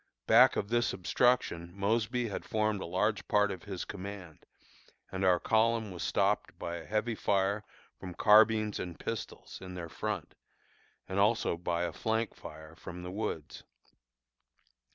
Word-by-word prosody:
Back - - +7
of 100 - -2
this 120 +1 +1
obstruction 90 -4 +1
Mosby 115 +4 0
had 100 - -4
formed 110 -2 0
a - - -4
large 100 +5 0
part 105 -1 +3
of 95 -1 -7
his 95 -3 -5
command, 95 -4 -8 0.6
and 95 0 -3
our 90 -2 +4
column 110 0 +2
was 90 - -7
stopped - - 0
by 85 0 -4
a 80 - -10
heavy 110 +2 0
fire 100 0 +1 0.4
from 90 -2 -8
carbines 110 0 +5
and 90 -2 -5
pistols - - -6
in 90 -1 -8
their 85 -2 -6
front - - -4 0.7
and 95 +1 -2
also 105 -3 +2
by 85 0 -2
a 85 -2 -2
flank 110 +3 -1
fire 80 0 -11
from 90 +1 -9
the 90 - -6
woods. 95 -6 -4
100 Hz, 155 wpm, -31 LUFS, 90-110 Hz, 0.7 s, Back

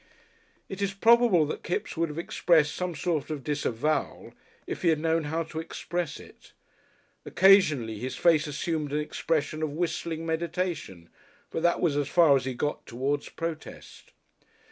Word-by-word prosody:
It 195 +1 -7
is 200 -1 -1
probable 225 -6 +5
that 150 - -5
Kipps 175 - -3
would 165 -1 0
have 150 - -8
expressed 165 -2 +2
some 180 -2 -3
sort 150 0 -2
of 150 -4 -4
disavowal, 150 0 -2 0.3
if - - -5
he 180 - +1
had 160 -2 +4
known 160 0 0
how 160 +3 -1
to 160 0 -7
express 170 +1 -4
it. - - -16 0.7
Occasionally 155 - +4
his 130 +3 -4
face 165 -3 +3
assumed 150 0 -3
an 150 - +1
expression 155 0 -2
of 155 - 0
whistling 165 0 -3
meditation, 165 - -3 0.4
but - - -3
that 175 +1 +2
was 165 -5 +2
as 145 - 0
far 165 -5 +5
as 130 -2 0
he 130 -1 -3
got 145 +4 -3
towards 140 +4 -2
protest. 165 -2 -7
160 Hz, 160 wpm, -27 LUFS, 145-170 Hz, 0.7 s, probable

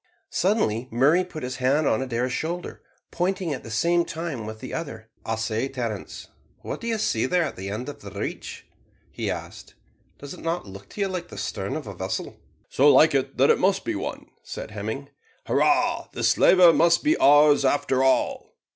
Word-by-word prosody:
Suddenly 150 - 0
Murray 145 +10 +3
put 165 -5 -8
his 125 0 -4
hand 135 +4 +2
on 135 - +1
Adair's 125 0 -2
shoulder, 170 +5 -4 0.3
pointing 180 -2 -1
at 130 - -6
the 115 - -10
same 170 +10 +2
time 160 -10 -5
with 110 0 -7
the 130 - -8
other 160 -7 -4
ahead. 110 0 -17 0.2
"I 115 - -1
say, 115 +2 -2
Terence, 120 -7 -5 0.3
what - - -6
do 235 - -5
you 225 -1 0
see 160 - 0
away - - -3
there 180 -1 +4
at 155 - -4
the 95 +1 -6
end 110 +6 -5
of 145 - -8
the 100 - -9
reach?" 100 0 -6 0.5
he - - -3
asked. - - -7 0.4
"Does 140 0 -9
it - - -11
not 165 +2 -2
look 100 0 -12
to 205 - -7
you 200 - +2
like 180 -2 -5
the - - -11
stern - - -4
of - - -5
a - - -7
vessel?" - - -5 0.3
"So 145 +2 +4
like 155 - +6
it 135 0 -1
that 135 - +5
it - - +2
must 195 +1 +1
be 345 - -1
one," 315 - -5 0.2
said - - -8
Hemming. - - -5 0.4
"Hurrah! - - +2
the - - -4
slaver 180 -3 +6
must 170 +1 +3
be 310 +2 +3
ours 145 0 +6
after 135 -1 +1
all." 135 - 0
140 Hz, 205 wpm, -24 LUFS, 120-175 Hz, 0.5 s, like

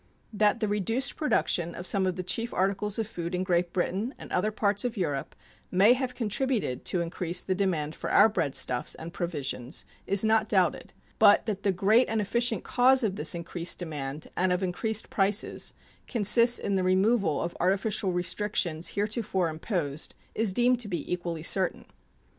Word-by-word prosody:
That 210 +2 +2
the 215 - +1
reduced 210 +6 0
production 170 - 0
of 175 - -7
some 190 0 +3
of 185 - -1
the 185 - -4
chief 230 +6 -2
articles 195 +2 0
of 225 - -1
food 175 -4 -5
in 180 - -1
Great 175 -2 0
Britain 195 +8 -2
and - - -11
other 185 +4 +1
parts 205 -1 0
of 245 -2 -3
Europe 145 -7 -3 0.3
may 195 +6 +5
have 255 0 -3
contributed 230 - -1
to 180 - 0
increase 170 +1 -3
the 190 - -1
demand 175 -6 -1
for - - -6
our 210 - +6
breadstuffs 140 - -1
and 165 +1 -9
provisions 145 -5 -3 0.2
is 200 +2 +2
not 220 0 +2
doubted, 185 -5 +1 0.3
but 205 -2 +6
that 205 -3 -3
the 200 - +2
great 210 +7 +3
and 220 0 0
efficient 225 +1 0
cause 260 +1 +3
of 200 -4 0
this 200 - +1
increased 170 0 -3
demand 150 -4 -5
and 185 0 +1
of 180 +1 0
increased 215 +4 -1
prices 200 +1 0 0.4
consists 235 +2 +4
in 200 -1 -1
the 185 - 0
removal 190 -2 +2
of 170 - -3
artificial 195 +1 +1
restrictions 180 -2 -1
heretofore 205 -4 -1
imposed 155 -3 -3 0.2
is 220 -3 0
deemed 245 +4 +2
to 235 - -2
be 175 -3 -3
equally 170 -3 -4
certain. 185 +2 +2
190 Hz, 175 wpm, -28 LUFS, 175-220 Hz, 0.4 s, our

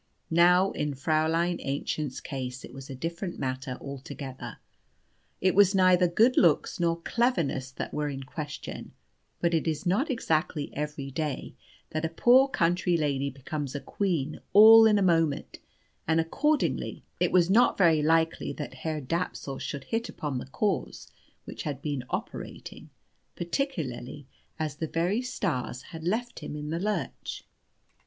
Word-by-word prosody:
Now 180 +3 +5
in 150 -1 -2
Fräulein 160 +4 +1
Aennchen's 140 0 -3
case 130 -2 -5
it - - -13
was 135 +1 -10
a 135 - -6
different 170 +6 -4
matter 130 0 -3
altogether. 135 -3 -7 0.8
It 185 0 +3
was 200 0 +5
neither 185 -1 +5
good 225 +9 +3
looks 165 -1 +3
nor 170 -1 +1
cleverness 165 - 0
that - - -5
were 150 -1 -1
in 135 -1 -5
question; 150 +2 -7 0.5
but 170 0 +2
it 165 0 +1
is 155 +2 -2
not 205 - +1
exactly 160 - -1
every 150 -2 -4
day 150 0 -3 0.4
that 155 +1 -2
a 160 - 0
poor 245 +10 +5
country 175 -6 +1
lady 140 -3 0
becomes 140 +1 -5
a - - -1
queen 160 -5 -2
all 220 +2 +10
in 210 -1 +4
a 200 - +2
moment, 165 -5 +1 0.5
and 160 +1 +3
accordingly 290 - 0 0.2
it - - +2
was 180 0 +4
not 240 +4 +5
very 165 -5 +4
likely 165 +2 +2
that 150 - -6
Herr 155 -2 -2
Dapsul 140 -2 -3
should 140 -2 -5
hit 230 - -2
upon 145 -10 -4
the - - -8
cause 195 +7 -2 0.3
which - - -7
had 145 -3 -4
been 140 -3 -3
operating, - - -6 0.5
particularly 155 - -3 0.3
as 155 -2 -3
the 160 - -2
very 175 +9 0
stars 150 - -3
had 160 -1 -7
left 235 +7 -2
him - - -6
in 150 0 -5
the 165 - -1
lurch. 210 +3 -3
160 Hz, 150 wpm, -28 LUFS, 140-185 Hz, 0.8 s, all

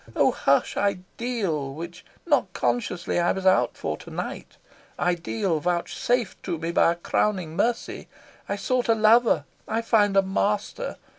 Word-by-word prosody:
Oh - - +4
hush, - - +1
ideal 190 - -2
which 170 +2 -8 0.2
not 290 - +2
consciously 120 +10 -1
I 175 - +2
was 190 0 -5
out 190 0 +3
for - - -3
to - - -12
night - - -6 0.4
ideal 175 0 0
vouchsafed 180 +8 -1
to 175 -3 -3
me 165 +1 -3
by 170 - +4
a - - -10
crowning 175 -1 -1
mercy! 230 +6 -1 0.4
I 200 - 0
sought 245 +5 -1
a 225 - +5
lover, 225 +2 +4 0.2
I 225 +1 -1
find 205 -3 +3
a 195 - +6
master. 205 - -1
195 Hz, 150 wpm, -25 LUFS, 170-225 Hz, 0.4 s, a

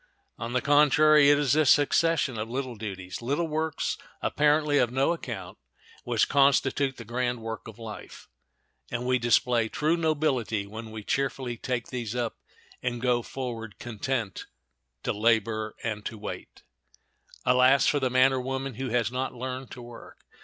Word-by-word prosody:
On 115 +1 -4
the 125 - 0
contrary, 150 0 +6
it 145 - +6
is 145 -2 +2
this 155 -2 +4
succession 145 -4 +3
of 110 +1 -4
little 130 0 -3
duties—little 110 - -3
works 155 0 -2 0.2
apparently 150 0 +2
of 125 -3 +3
no 135 +6 +2
account—which 115 - -4
constitute 140 -1 +2
the 115 - -9
grand 120 +1 -1
work 110 -1 -6
of 110 - -10
life; 115 -2 -9 0.6
and 120 +1 -3
we 125 0 +2
display 120 0 +2
true 155 +7 +1
nobility 145 - 0
when 110 +2 -8
we 110 -1 -8
cheerfully 130 0 -1
take 120 0 -3
these 120 -3 -4
up 120 -2 -2 0.4
and 120 -1 -2
go 120 -1 +2
forward, 115 -5 -6
content 120 -2 -3 0.6
to - - 0
"Labor 110 0 +1
and 105 -2 -3
to 110 - -7
wait." - - -8 0.8
Alas 125 +2 +5
for 145 - +3
the 130 -2 0
man 130 +1 +4
or 130 - -1
woman 135 +1 -3
who 130 +3 -4
has 115 -1 +1
not 130 +1 -3
learned 130 +1 -5
to 125 - -9
work! 120 -1 -13
125 Hz, 155 wpm, -27 LUFS, 115-140 Hz, 0.8 s, contrary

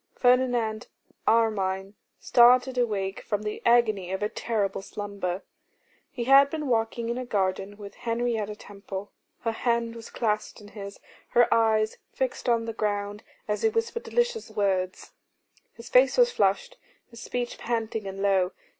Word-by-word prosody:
Ferdinand 245 -3 +2 0.4
Armine 195 -4 +1 0.3
started 250 +1 +5
awake 200 -6 -1
from 205 0 -3
the 210 0 -4
agony 215 -6 +3
of 190 +2 -2
a 210 - 0
terrible 210 -5 -2
slumber. 200 -2 -4 0.7
He 240 - -4
had 275 +3 +7
been 305 -1 -4
walking 230 -1 0
in 240 +1 -2
a - - -3
garden 195 -2 -1
with 200 -1 -9
Henrietta 230 -3 -2
Temple, 200 -1 -8 0.3
her 230 - 0
hand 235 0 -1
was 230 -1 -9
clasped 215 -2 -2
in 205 -1 -13
his, 200 -1 -9 0.3
her 240 0 +4
eyes 220 -1 +2
fixed 255 -1 -2
on 230 -1 +2
the 225 - -4
ground, 205 -1 -2 0.3
as 210 0 -1
he 445 - +4
whispered 455 +1 -2
delicious 480 - -1
words. 195 -3 -1 0.6
His 230 0 -11
face 255 - +4
was 485 -1 +5
flushed, - - 0 0.3
his 235 -1 -11
speech 245 0 -4
panting 225 -3 -2
and 195 +1 -5
low. 190 -2 +2
225 Hz, 150 wpm, -27 LUFS, 205-245 Hz, 0.7 s, had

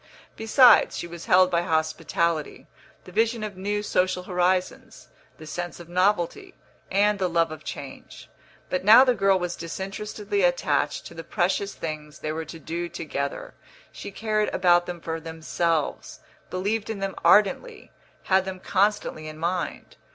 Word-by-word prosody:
Besides, 240 +3 +5
she - - -4
was 170 -1 -9
held 185 0 +5
by 170 -1 +2
hospitality, 165 -1 -1 0.4
the 180 - -13
vision 225 +2 +1
of 210 -2 -5
new 205 +2 -2
social 185 -2 0
horizons, 180 0 -1 0.3
the 155 - -11
sense 175 +3 -5
of 170 - -11
novelty, 190 - 0 0.3
and 205 +1 +2
the 185 -1 0
love 165 -1 +1
of 155 -1 -9
change. 140 -2 -9 0.4
But 185 - -1
now 220 +6 +9
the 255 -2 +3
girl 195 -3 +3
was 180 -1 -3
disinterestedly 200 - -4
attached - - +1
to - - -10
the - - -8
precious 405 -2 -1
things 155 -2 -6
they 155 - -4
were 160 +1 -4
to 165 - -9
do 170 +2 -5
together; 140 -4 -5 0.4
she - - -8
cared 215 +1 -1
about 175 -1 +3
them 175 -1 -6
for 165 0 -4
themselves, 160 0 -2 0.3
believed 205 +4 -2
in 220 - -3
them 195 -1 -3
ardently, 210 - +3 0.3
had 190 0 +3
them 190 -1 -6
constantly 195 -5 0
in 155 0 -8
mind. 175 +3 -3
185 Hz, 155 wpm, -25 LUFS, 165-205 Hz, 0.4 s, now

